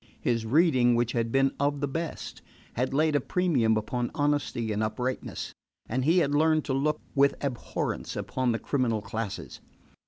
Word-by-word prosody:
His 115 -2 0
reading, 130 -3 +4
which 120 0 +1
had 115 -1 -1
been 135 +1 +3
of 145 0 +1
the 145 - -1
best, 165 +4 -5 0.3
had 125 +2 -1
laid 155 +2 +2
a 145 - +3
premium 130 -11 +2
upon 120 +3 -2
honesty 145 -6 0
and 105 +1 -1
uprightness, 125 +4 -3 0.3
and 125 +3 -1
he 165 +6 +3
had 145 -5 +2
learned 155 +1 +3
to 135 - -1
look 150 +3 +1
with 140 0 +4
abhorrence 130 -4 -3
upon 130 -2 -1
the 115 - 0
criminal 115 -5 -1
classes. 110 -3 -5
130 Hz, 165 wpm, -28 LUFS, 115-145 Hz, 0.3 s, reading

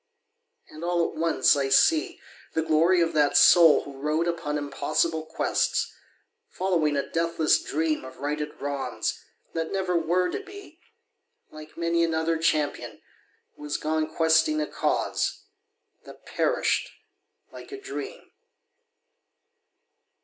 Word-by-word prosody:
And 155 +2 -11
all 175 -1 0
at - - -14
once 165 -1 +3
I 140 -1 -1
see 310 - +3 0.3
The 160 - 0
glory 165 +3 +3
of 165 - 0
that 150 -2 +3
soul 165 -4 +7
who 140 -1 -11
rode 155 +4 0
upon 155 -3 -2
Impossible 155 +3 -1
quests, 160 - -1 0.6
following 165 -6 0
a 140 - -2
deathless 165 -1 +1
dream 155 -1 -1
Of 130 0 -11
righted 150 +2 -4
wrongs, 140 -1 -3 0.3
that 165 -1 -3
never 185 -2 -1
were 175 +2 +1
to - - -3
be, 395 -4 -13 0.7
Like 155 0 -12
many 170 0 +1
another 165 0 0
champion 155 -2 -1 0.6
who - - -18
has 150 -1 -3
gone 155 0 -2
Questing 160 - +2
a 305 - 0
cause - - -2 0.6
that - - -14
perished - - 0 0.6
like - - -12
a 405 - -7
dream. 410 +4 -8
160 Hz, 125 wpm, -26 LUFS, 150-175 Hz, 0.7 s, soul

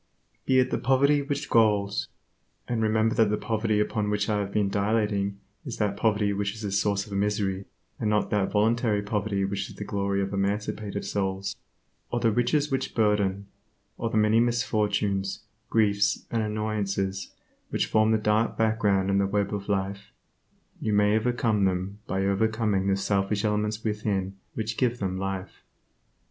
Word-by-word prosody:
Be 130 - +4
it 130 - +3
the - - 0
poverty 140 +2 +3
which 140 0 -3
galls 105 -3 +2 0.6
(and 120 -2 -1
remember 110 +1 +2
that 115 -4 +3
the 105 - +1
poverty 110 -2 0
upon 105 0 0
which 105 0 0
I 105 -1 +1
have 100 -1 -3
been 105 -1 +1
dilating 100 -1 0 0.3
is 130 -6 -6
that 105 -2 0
poverty 105 -1 +1
which 100 +1 -2
is 110 - -8
a 100 - -2
source 100 0 +1
of 105 - -10
misery, 100 -1 0 0.3
and 105 - 0
not 105 0 +1
that 100 -2 +1
voluntary 110 0 +2
poverty 100 -1 -1
which 100 0 -3
is - - -11
the - - -6
glory 100 -1 -1
of 95 - -4
emancipated 100 +1 -2
souls), 95 -1 -2 0.5
or 120 - -1
the 115 -1 +2
riches 140 +6 +1
which 135 - -2
burden, 100 -3 +1 0.5
or 115 - -2
the 110 - -1
many 110 +1 +4
misfortunes, 105 -5 0 0.3
griefs, 105 -1 +2
and 115 - +1
annoyances 105 -3 -2 0.4
which - - 0
form 110 0 +3
the 110 - +4
dark 105 +1 +1
background 105 -4 +2
in 100 - +3
the 100 - +2
web 100 0 0
of 100 0 -4
life, 100 0 -2 0.7
you 110 - -1
may 105 +1 +4
overcome 110 -3 +1
them 95 +2 -1
by 95 0 0
overcoming 105 -1 +1
the 95 0 +2
selfish 100 +1 0
elements 105 +1 -1
within 105 -3 -1 0.2
which 110 -1 -3
give 125 -2 +1
them 95 -3 -2
life. 95 -1 -5
105 Hz, 170 wpm, -27 LUFS, 100-110 Hz, 0.7 s, Be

